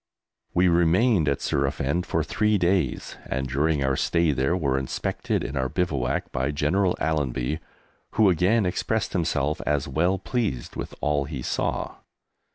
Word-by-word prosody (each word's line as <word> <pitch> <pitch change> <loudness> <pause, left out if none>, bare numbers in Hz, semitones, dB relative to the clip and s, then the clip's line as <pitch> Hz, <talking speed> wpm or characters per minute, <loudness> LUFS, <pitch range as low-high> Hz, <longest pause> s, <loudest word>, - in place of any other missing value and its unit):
We 90 +1 +4
remained 85 +2 +3
at 70 - -1
Surafend 70 +4 0
for - - 0
three 105 0 +1
days, 90 0 0
and 65 0 -2
during 70 +2 +1
our 65 0 +1
stay 85 +3 +2
there, 70 +6 +1
were 70 -6 +1
inspected 65 - -2
in 65 - -4
our 65 -1 0
bivouac 70 -9 -1
by 65 +2 -1
General 90 +6 +1
Allenby, 75 -1 -1 0.5
who 110 -1 +4
again 95 +5 +3
expressed 105 +4 -1
himself 75 -4 0
as 75 -2 0
well 85 +8 +1
pleased 100 - -3
with - - -6
all 75 -1 +1
he 65 -3 -6
saw. - - -2
75 Hz, 150 wpm, -25 LUFS, 70-90 Hz, 0.5 s, We